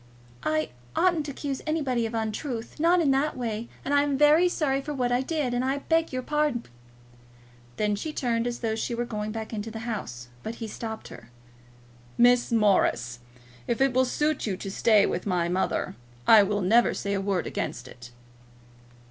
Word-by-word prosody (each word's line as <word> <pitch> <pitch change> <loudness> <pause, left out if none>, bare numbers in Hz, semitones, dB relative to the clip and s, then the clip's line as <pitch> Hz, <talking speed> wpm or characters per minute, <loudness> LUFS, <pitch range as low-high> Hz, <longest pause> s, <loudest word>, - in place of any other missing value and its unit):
"I 155 0 0 0.3
oughtn't 340 -5 +2
to - - -3
accuse 275 -1 -4
anybody 265 -7 0
of 225 - -6
an 225 - +1
untruth, 235 +3 -5
not 340 +3 +4
in 290 -4 +3
that 275 +2 +1
way; 230 -2 -3 0.2
and 280 - -1
I 285 - +5
am 285 -1 0
very 305 +5 +5
sorry 275 -5 0
for 295 +1 -5
what 250 -2 0
I 245 +1 +2
did, 280 -3 -1
and 245 +1 0
I 265 +2 0
beg 325 +3 +1
your 255 -1 -3
pardon." 295 -4 0 1.1
Then 210 -1 +1
she 305 +10 -4
turned 240 -5 -1
as 240 0 -4
though 225 -2 0
she 225 +2 -2
were 240 +1 -2
going 215 -2 -4
back 220 0 -5
to 220 0 -5
the 225 - -7
house. 125 - -5
But 225 - -5
he 225 -1 -6
stopped 220 +1 -6
her. 120 0 -12 0.9
"Miss 245 0 +4
Morris, 195 - +2 0.5
if 235 - -1
it 270 -1 +3
will 260 +1 +3
suit 300 +1 0
you 190 -3 -2
to 195 - -6
stay 210 0 +4
with 180 - -2
my 175 -3 +1
mother, 185 +1 -1 0.3
I 220 +5 +8
will 205 +1 0
never 225 +6 +4
say 200 - -2
a 195 - 0
word 195 -2 -1
against 125 +1 -4
it." 120 -1 -12
235 Hz, 195 wpm, -26 LUFS, 210-275 Hz, 1.1 s, I